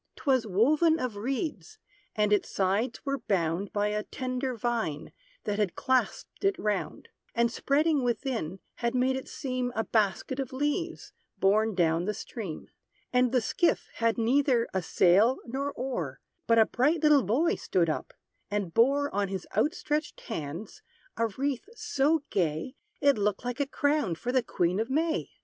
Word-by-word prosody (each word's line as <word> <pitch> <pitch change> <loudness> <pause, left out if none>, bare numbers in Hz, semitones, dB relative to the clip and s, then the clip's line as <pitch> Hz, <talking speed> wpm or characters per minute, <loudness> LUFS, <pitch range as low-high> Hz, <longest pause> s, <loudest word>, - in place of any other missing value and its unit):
'Twas 260 -6 +1
woven 300 - +3
of 250 -4 -2
reeds, 275 - -3 0.4
and 210 -1 +2
its 205 - +1
sides 205 +8 0
were 275 0 -1
bound 185 -3 -1
By 205 0 0
a 210 0 -1
tender 255 +2 -3
vine, 225 -10 -2 0.3
that 210 0 -2
had 205 -4 0
clasped 260 +8 -1
it 395 0 +2
round; 210 - -2 0.3
And 235 0 +2
spreading 295 +4 +2
within, 235 - -2 0.2
had 235 +1 -1
made 255 +1 +2
it 265 - -5
seem 255 -2 -3
A 225 - +1
basket 220 +5 0
of 265 -2 -3
leaves, 295 +6 -2 0.2
borne 215 +2 +3
down 170 -1 +2
the 210 +1 -1
stream. 205 -6 -7 0.4
And 250 -1 +3
the 255 -2 +3
skiff 335 +9 +1
had 230 0 +1
neither 245 0 +2
a 190 - 0
sail 195 +9 +4
nor 275 +4 -3
oar; 235 - -4 0.3
But 230 - +4
a 220 - +7
bright 295 +9 +1
little 300 -2 +6
boy 255 - +2
stood 175 -2 0
up, 155 - -3 0.4
and 205 -5 -2
bore, 280 +5 +3
On 200 0 +1
his 190 -2 -5
outstretched 295 +5 -1
hands, 175 - -6 0.3
a 230 - +1
wreath 275 - -3
so 295 - +1
gay, 165 +5 -1 0.3
It 280 -6 +4
looked 205 +3 0
like 245 +1 -3
a 285 - +1
crown 285 - +1
for 240 +9 -3
the 255 0 +3
Queen 180 -4 0
of 225 +3 -1
May. 315 +4 0
235 Hz, 165 wpm, -28 LUFS, 205-275 Hz, 0.4 s, a